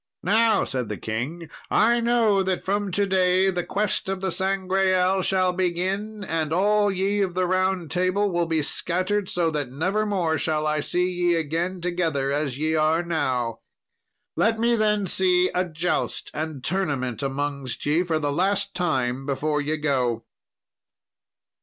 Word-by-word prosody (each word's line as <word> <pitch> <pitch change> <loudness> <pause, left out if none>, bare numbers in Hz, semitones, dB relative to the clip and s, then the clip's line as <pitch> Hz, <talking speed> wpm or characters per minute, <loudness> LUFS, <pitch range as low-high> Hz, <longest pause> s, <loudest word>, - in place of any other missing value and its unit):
"Now," 220 +3 +3
said 125 -4 -3
the 105 - -4
king, 130 - -4 0.2
"I 235 +2 +3
know 230 -4 +3
that 190 -1 -1
from 205 +1 0
to 200 +2 +2
day 190 0 +3
the 175 -1 -2
quest 200 0 -1
of 195 -1 -2
the 190 0 -1
Sangreal 190 0 +1
shall 185 -1 +1
begin, 190 +4 -2
and 160 -4 -2
all 205 +4 +3
ye 195 +2 0
of 185 -3 -1
the 185 0 +1
Round 185 -2 0
Table 185 +3 +1
will 170 -1 0
be 160 -2 0
scattered 185 +6 -1
so 170 -2 +1
that 145 -5 -3
nevermore 180 +1 0
shall 155 -1 0
I 150 0 +1
see 180 +4 0
ye 175 -1 +1
again 165 +3 -2
together 165 -6 -1
as 140 -3 -1
ye 155 +2 0
are 160 +2 +2
now; 125 -9 -1 0.8
let 225 +1 +2
me 235 +1 +3
then 210 -2 +1
see 180 0 +3
a 180 +1 0
joust 160 0 -2
and 155 -4 -4
tournament 140 - -1
amongst 140 -1 -3
ye 150 +4 +2
for 170 -3 0
the 145 -2 -1
last 200 +4 0
time 135 -7 -1
before 150 +2 0
ye 155 +2 -1
go." 125 -6 0
180 Hz, 160 wpm, -24 LUFS, 150-195 Hz, 0.8 s, Now